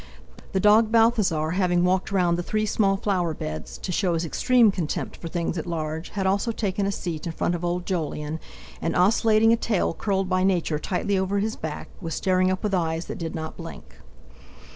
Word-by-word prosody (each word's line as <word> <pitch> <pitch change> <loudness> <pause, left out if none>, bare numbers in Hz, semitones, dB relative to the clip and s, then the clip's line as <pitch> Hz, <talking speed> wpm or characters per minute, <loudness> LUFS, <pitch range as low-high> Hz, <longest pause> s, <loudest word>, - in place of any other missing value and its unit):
The 190 - +2
dog 215 +2 +5
Balthasar, 215 -9 +3
having 180 -1 +2
walked 185 +1 +1
round 180 -3 +2
the 175 - -2
three 215 +4 -1
small 200 -2 +2
flower 180 -5 0
beds, 75 - -6
to 185 - -5
show 180 -1 +1
his 165 +1 -1
extreme 235 - +4
contempt 175 -6 -3
for 170 - -8
things 170 0 -2
at 160 - -6
large, 160 -1 -3
had 195 -2 -3
also 200 +4 +1
taken 200 -2 -1
a - - 0
seat 170 -5 -4
in - - -2
front 175 - 0
of 175 0 -3
old 175 +1 -1
Jolyon, 155 -3 -3 0.4
and, 165 - -1
oscillating 220 +3 +4
a - - +3
tail 215 -7 0
curled 195 0 -1
by 185 0 +1
Nature 175 -5 +1
tightly 190 +4 -1
over 190 +1 0
his 215 +2 -1
back, 155 -1 -6
was 165 -3 -4
staring 185 -1 +2
up 185 0 -2
with 210 -2 -1
eyes 165 -2 0
that - - -6
did 165 -2 -4
not 160 -1 -5
blink. 65 - -10
185 Hz, 205 wpm, -25 LUFS, 165-200 Hz, 0.4 s, dog